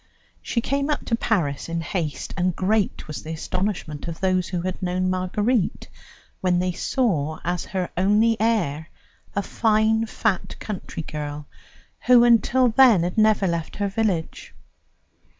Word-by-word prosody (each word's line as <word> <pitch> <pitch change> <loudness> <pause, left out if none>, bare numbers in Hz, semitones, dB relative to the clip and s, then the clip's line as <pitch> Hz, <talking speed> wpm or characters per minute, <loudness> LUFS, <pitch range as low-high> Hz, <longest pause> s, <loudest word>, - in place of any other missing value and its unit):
She 235 - -1
came 280 +4 -1
up 300 - -1
to 230 - +1
Paris 170 -12 -1
in 165 0 -2
haste, 160 -5 -3
and 180 -1 0
great 205 +2 0
was 150 - -6
the 160 - -6
astonishment 175 -2 -3
of 165 -1 -6
those 185 -2 +1
who 180 -2 -3
had 185 +1 -4
known 185 0 0
Marguerite 195 +4 -1 0.5
when 180 -1 +1
they 180 +1 0
saw 170 - -1
as 175 0 -2
her 185 -2 -2
only 210 +5 +3
heir 170 -9 0 0.5
a 200 - 0
fine, 220 +1 +2
fat 215 -3 -1
country 195 -5 -6
girl, 150 -1 -6 0.6
who 245 -1 +7
until 240 +2 +4
then 230 -6 +6
had 175 +1 -2
never 215 -2 +4
left 170 -3 -2
her 205 -1 -1
village. 195 -6 -2
185 Hz, 150 wpm, -23 LUFS, 170-220 Hz, 0.6 s, who